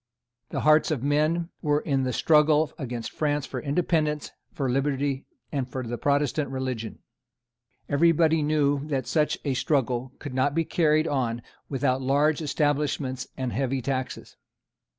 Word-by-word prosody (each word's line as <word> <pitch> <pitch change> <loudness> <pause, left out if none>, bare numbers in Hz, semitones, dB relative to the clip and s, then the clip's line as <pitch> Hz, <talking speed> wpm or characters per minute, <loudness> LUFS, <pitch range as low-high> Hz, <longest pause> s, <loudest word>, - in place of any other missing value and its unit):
The - - -3
hearts 155 0 +5
of 145 -6 -1
men 155 +4 +1
were 150 -2 +1
in 135 -4 0
the 130 - 0
struggle 150 +3 +3
against 120 -4 -4
France 145 -2 -1
for - - -5
independence, 150 0 0 0.2
for 135 - -2
liberty, 135 +1 -1 0.2
and 135 -4 -2
for 130 0 -4
the 120 +1 -3
Protestant 145 0 +1
religion. 130 -4 -4 0.8
Everybody 160 +1 +3
knew 145 -2 +1
that 135 -3 -1
such 150 -2 +1
a 140 - +1
struggle 130 -2 0
could 145 -3 -7
not 130 +3 +1
be 165 0 +1
carried 155 -1 +2
on 120 -4 -1 0.3
without 130 -1 0
large 145 +4 +2
establishments 145 -3 -1
and 130 -2 -2
heavy 135 0 0
taxes. 130 +1 -4
145 Hz, 145 wpm, -26 LUFS, 130-150 Hz, 0.8 s, hearts